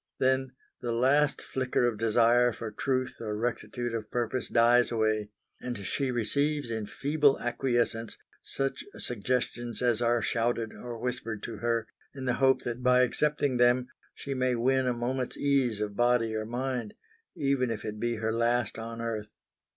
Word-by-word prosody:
Then 130 0 +1 0.3
the 120 - -2
last 135 +5 +3
flicker 130 -2 0
of 115 -3 0
desire 120 +2 +4
for 110 -1 -6
truth 130 +3 -1
or 105 -2 -3
rectitude 120 +1 -3
of 110 -2 -4
purpose 120 +1 -2
dies 120 +1 +4
away, 110 -2 +1 0.3
and 125 -2 -4
she 135 +6 -1
receives 140 +3 0
in 110 -2 -3
feeble 145 +2 +2
acquiescence 120 -2 -1 0.2
such 135 0 -3
suggestions 120 +1 -2
as 120 -2 +1
are 120 0 +2
shouted 115 -2 0
or 120 +2 -7
whispered 115 -3 -4
to 115 - -5
her, 115 +1 0 0.3
in 135 -1 -6
the 125 - +2
hope 130 0 +4
that 120 +1 -4
by 125 0 +5
accepting 145 0 +1
them 125 +1 +3 0.3
she 140 - -5
may 130 -1 +1
win 130 +2 +2
a 125 - +2
moment's 125 +2 -2
ease 135 -6 +1
of 105 -1 -3
body 120 -2 +2
or 110 0 -2
mind, 125 -2 -3 0.4
even 135 -3 +1
if 115 -2 -4
it 105 0 -5
be 120 +1 0
her 110 0 -1
last 120 0 +1
on 115 +1 -6
earth. 110 -2 -3
120 Hz, 165 wpm, -29 LUFS, 115-130 Hz, 0.4 s, by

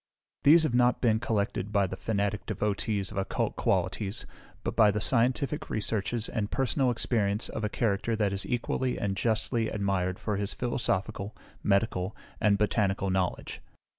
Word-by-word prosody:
These 160 +3 +7
have 155 - 0
not 125 0 +3
been 110 -3 +3
collected 105 -3 -1
by 100 -2 +3
the 95 - -4
fanatic 100 -1 -2
devotees 100 -1 -1
of 105 - -7
occult 95 - -1
qualities, 95 +3 -1 0.4
but - - -2
by 110 -2 +6
the 105 +1 0
scientific 130 +6 +1
researches 110 +1 -1
and 105 -3 -2
personal 135 +1 +1
experience 110 -3 0
of 110 - -4
a 105 - 0
character 110 0 0
that 105 -3 +1
is 95 - -1
equally 125 +1 -1
and 100 -1 -1
justly 115 +2 0
admired 95 -3 -1
for 105 -2 -2
his 100 0 -3
philosophical, 105 -4 -2 0.2
medical, 100 -2 +1 0.2
and 105 -1 +3
botanical 100 -2 +1
knowledge. 95 -1 -2
105 Hz, 155 wpm, -29 LUFS, 100-115 Hz, 0.4 s, These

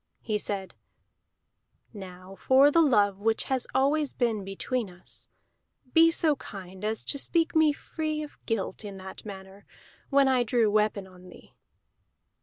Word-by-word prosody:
He 215 -2 -1
said: 195 -2 -5 1.2
"Now 185 -2 -10
for 270 +2 +5
the 335 - +5
love 205 -9 +3
which 220 +2 +1
has 260 -2 -1
always 285 +2 +2
been 225 -5 0
between 200 +4 -3
us, 180 0 -8 0.7
be 330 0 +7
so 320 -2 +2
kind 190 -3 -10
as 220 +1 -1
to 280 - -1
speak 330 +3 +1
me 315 -1 +5
free 310 +1 -4
of 295 - -12
guilt 220 -3 -2
in 200 -2 -7
that 190 +2 -9
matter, 195 0 -10 0.5
when 275 -1 +4
I 260 -2 +3
drew 230 -2 +2
weapon 210 -2 +1
on 185 -1 -15
thee." - - -16
220 Hz, 150 wpm, -27 LUFS, 195-280 Hz, 1.2 s, be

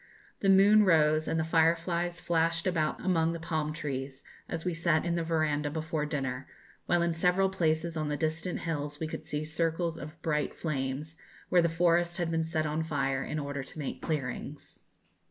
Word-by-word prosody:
The 195 - +2
moon 200 +2 +7
rose, 155 -4 +4
and 160 - 0
the - - +1
fireflies 170 +2 +1
flashed 165 -1 +1
about 160 -5 0
among 165 -3 +2
the 170 - -5
palm 155 -2 -2
trees, 135 -3 -5 0.3
as 165 - -4
we 180 - 0
sat 165 -1 +1
in 170 - 0
the 170 -1 0
verandah 155 -3 0
before 155 0 -2
dinner, 135 -3 -3 0.4
while 175 0 +3
in 170 -1 +1
several 180 +3 +2
places 165 -2 0
on 155 -1 -1
the 145 - -1
distant 160 +3 -2
hills 145 -3 -3
we 160 - -2
could 155 - -6
see 150 +1 -2
circles 165 +1 -1
of 155 +3 -9
bright 150 -3 0
flames, 150 +1 -3 0.3
where 180 - +5
the 170 - +2
forest 170 +1 +2
had 170 -2 -1
been 165 0 +1
set 160 -1 -1
on 155 +1 -1
fire 135 -4 -1
in 150 - -4
order 140 -1 -3
to 135 - -9
make 145 -3 -5
clearings. 145 -1 -4
160 Hz, 190 wpm, -30 LUFS, 150-170 Hz, 0.4 s, moon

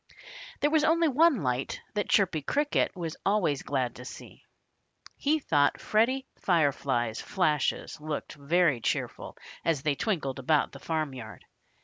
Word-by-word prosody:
There 295 - +3
was 310 -1 +3
only 330 +1 +4
one 290 - +4
light 125 0 -1
that 205 -2 -2
Chirpy 180 -6 +3
Cricket 290 - 0
was 165 -3 -4
always 195 -9 +1
glad 130 -4 -1
to 125 - -9
see. - - -11 0.7
He 300 +2 +1
thought 145 - +2
Freddie 255 +5 +1
Firefly's 140 - +1
flashes 155 -5 0
looked 155 -1 -4
very 150 -2 +2
cheerful - - -3 0.3
as 155 -5 0
they 150 - +2
twinkled 140 - -2
about 150 +3 +2
the 140 - -11
farmyard. 140 -7 -4
155 Hz, 135 wpm, -28 LUFS, 140-215 Hz, 0.7 s, only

